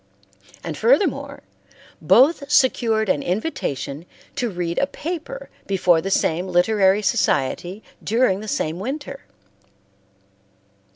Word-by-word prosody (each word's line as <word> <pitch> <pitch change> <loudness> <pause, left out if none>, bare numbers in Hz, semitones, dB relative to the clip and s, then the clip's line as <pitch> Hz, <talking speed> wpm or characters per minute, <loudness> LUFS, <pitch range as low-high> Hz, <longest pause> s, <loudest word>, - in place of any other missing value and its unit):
And 165 -3 -5
furthermore, 260 - +1 0.6
both 280 +2 +4
secured 230 -6 +2
an 150 -6 +1
invitation 175 - -3 0.3
to 250 -4 -1
read 175 -3 -3
a 275 - +1
paper 355 +13 -6 0.2
before 180 -4 +3
the 195 - -4
same 180 -1 0
literary 190 +2 +3
society 180 +3 0 0.2
during 225 -4 +2
the 215 - -8
same 160 -4 -2
winter. 275 +5 -6
205 Hz, 105 wpm, -21 LUFS, 175-265 Hz, 0.6 s, both